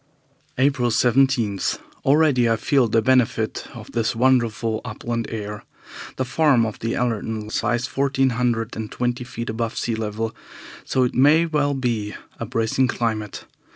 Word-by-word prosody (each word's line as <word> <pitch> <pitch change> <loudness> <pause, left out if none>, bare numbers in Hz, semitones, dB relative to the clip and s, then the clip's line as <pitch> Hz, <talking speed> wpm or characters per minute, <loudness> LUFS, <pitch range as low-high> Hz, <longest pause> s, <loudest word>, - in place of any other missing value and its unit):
April 130 -2 +2
17. 120 -3 +2 0.5
Already 140 -4 +4
I 115 - +3
feel 125 +3 +2
the 110 0 +2
benefit 125 -3 +1
of - - -10
this 115 -1 0
wonderful 115 -3 +1
upland 115 -1 -4
air. 105 -2 -5 0.5
The 130 - -1
farm 135 -3 +3
of 110 - -5
the 115 +1 -2
Allertons 110 -2 -2
lies 120 +2 0
fourteen 135 0 +1
hundred 115 -1 -1
and 110 -1 -5
twenty 120 +1 -2
feet 120 -1 -5
above 115 0 -3
sea 120 - -1
level, 110 0 -3 0.5
so 130 - +1
it 125 - 0
may 150 +6 +5
well 145 -3 0
be 115 -5 -2 0.2
a - - -4
bracing 115 +3 +1
climate. 110 -4 -3
120 Hz, 150 wpm, -22 LUFS, 110-130 Hz, 0.5 s, may